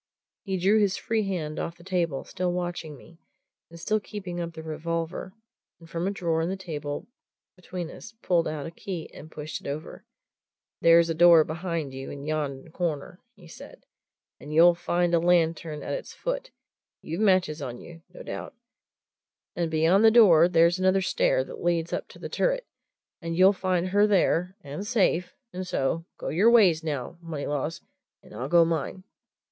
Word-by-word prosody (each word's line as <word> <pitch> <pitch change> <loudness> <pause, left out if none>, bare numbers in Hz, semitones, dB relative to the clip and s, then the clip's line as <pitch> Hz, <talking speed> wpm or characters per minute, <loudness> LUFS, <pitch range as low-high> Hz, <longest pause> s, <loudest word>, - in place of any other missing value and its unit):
He 190 -2 -3
drew 195 +4 +3
his 200 -3 +2
free 220 -3 -1
hand 160 -5 -3
off 165 - -4
the 170 - -16
table, 170 -6 -1
still 180 -1 -2
watching 175 -4 -4
me, 165 +5 -17 0.5
and 170 0 -12
still 215 +5 0
keeping 190 -4 -7
up 170 -1 -5
the 160 - -8
revolver, 165 +3 -4 0.5
and 165 - -15
from 170 +2 -3
a - - +2
drawer 170 -5 -1
in 165 - -1
the 190 - -3
table 150 -3 -5 0.5
between 180 -2 -6
us 225 - -11
pulled 170 -2 +2
out 155 -2 -4
a 165 - -6
key 170 -1 -7
and 155 - -11
pushed 155 0 -6
it - - -9
over. 145 +2 -6 0.8
"There's 165 0 +6
a - - +1
door 170 -1 +7
behind 160 -3 -4
you 135 0 -7
in 140 0 -8
yon 150 -2 -3
corner," 170 +1 -3 0.2
he 180 -4 -16
said. - - -13 0.6
"And 150 - -10
you'll 170 +3 +7
find 175 0 0
a 170 - +5
lantern 165 -2 +1
at - - -4
its - - -6
foot - - -4 0.5
you've 165 +6 -4
matches 185 -7 +2
on 125 -3 -5
you, 165 -1 -12
no - - -11
doubt. - - -7 1.0
And 170 -1 -1
beyond 165 +6 +3
the 225 - +8
door 180 -8 +7
there's 170 +1 +4
another 185 +1 +3
stair - - +1
that - - -10
leads 170 -1 0
up - - -3
to - - -15
the - - -6
turret, - - 0 0.6
and 165 -1 -4
you'll 190 +2 +6
find 185 -1 -1
her 205 +2 +4
there 185 -2 +1
and 145 +3 -6
safe 180 -6 +1 0.2
and 185 0 -5
so 165 +2 -1
go - - -5
your 195 +9 +4
ways, 190 -9 +5
now, 150 +1 -4
Moneylaws, 150 -1 -4 0.4
and - - -16
I'll 125 +6 -5
go 170 0 +6
mine!" 165 +3 -3
170 Hz, 180 wpm, -26 LUFS, 160-185 Hz, 1.0 s, the